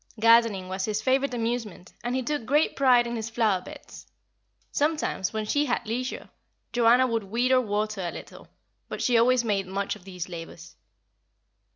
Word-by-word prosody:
Gardening 230 -4 +4
was 190 +1 -3
his 215 -1 -1
favourite 260 +2 +1
amusement, 225 -6 -4
and 245 +1 -2
he 260 - -1
took 295 0 -2
great 295 +7 +2
pride 250 -3 +4
in 235 0 -4
his 225 -1 -4
flower 220 -5 +1
beds. - - -12 0.6
Sometimes, 295 - -1
when 220 -1 -3
she 290 +7 +1
had 245 - -1
leisure, 250 +4 -4 0.4
Joanna 245 +2 +5
would 230 -4 -1
weed 240 +6 0
or 255 -1 +5
water 215 -2 -2
a 175 - -2
little; - - -11 0.4
but - - -4
she 245 - +2
always 240 +1 +4
made 200 -4 -1
much 195 +1 -2
of - - -15
these 180 -2 -7
labours. 170 -1 -10
230 Hz, 175 wpm, -26 LUFS, 200-250 Hz, 0.6 s, Joanna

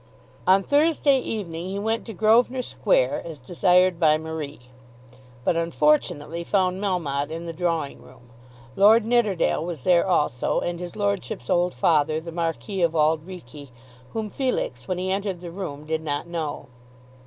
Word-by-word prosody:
On 190 +1 +5
Thursday 290 -1 +3
evening 180 -8 -4
he 195 +1 -4
went 225 +3 -2
to 225 - -6
Grosvenor 235 +6 +3
Square, - - +1
as 160 -3 -8
desired 180 +5 +2
by 155 -3 +4
Marie, 155 -3 -6 0.8
but 170 - +1
unfortunately 155 0 +1
found 185 0 0
Melmotte 150 -8 -1
in 165 +2 -6
the 165 - -5
drawing 165 -4 -2
room. 125 -1 -18 0.4
Lord 215 +3 +6
Nidderdale 220 -9 +1
was 165 -6 -5
there 180 0 +4
also, 150 -9 +1
and 175 -1 -3
his 175 -1 -7
lordship's 100 +4 -2
old 175 -2 +2
father, 155 +3 +2
the 165 +1 -8
Marquis 170 +4 -3
of 165 -1 +2
Auld 155 +1 +2
Reekie, 150 -6 -10 0.4
whom 220 -2 -3
Felix, 250 - -2
when 185 - -2
he 185 +1 -2
entered 195 -2 -2
the 175 -1 -8
room, 150 -6 -6
did 160 0 -2
not 145 -1 -3
know. 160 -5 -5
170 Hz, 155 wpm, -24 LUFS, 155-195 Hz, 0.8 s, Lord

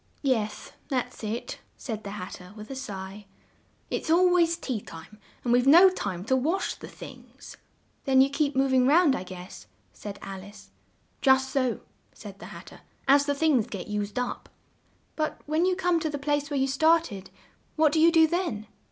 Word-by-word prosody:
"Yes, 220 -6 -1 0.2
that's 255 -4 -3
it," 220 +3 -4 0.2
said 220 -4 -6
the 200 - -6
Hat 185 - -7
ter 180 +2 -11
with 215 +3 -10
a - - -5
sigh: 200 -5 -7 0.6
"it's - - -3
al 355 +2 +5
ways 335 -1 +3
tea 255 -10 -4
time, 165 +6 -12 0.2
and 240 - +1
we've 245 +2 +3
no 350 +6 +8
time 190 - -4
to 260 - +2
wash 320 +9 0
the - - -11
things." - - -12 0.5
"Then 265 -2 +4
you 270 +1 +5
keep 285 -1 0
mov 265 0 +2
ing 255 -1 +4
round, 305 -1 +5
I - - -4
guess," 185 0 -10 0.3
said 205 -1 -8
Al 195 -1 -7
ice. 205 +2 -14 0.5
"Just 265 -1 +4
so," 255 -3 0 0.3
said - - -11
the - - -9
Hat - - -11
ter; - - -14 0.3
"as 285 +1 +5
the 285 - +1
things 280 -7 +2
get 200 -4 -7
used 210 0 -3
up." 250 0 -3 0.7
"But 310 -1 -2
when 315 +4 +1
you 370 - +2
come 355 -2 +1
to 315 - -2
the 290 - -3
place 290 0 -1
where 285 -2 -1
you 265 - +2
started, 275 - +1 0.5
what 310 -1 +4
do 315 - +1
you 330 +2 +6
do 325 -1 +6
then?" 315 - -2
265 Hz, 195 wpm, -27 LUFS, 210-315 Hz, 0.7 s, no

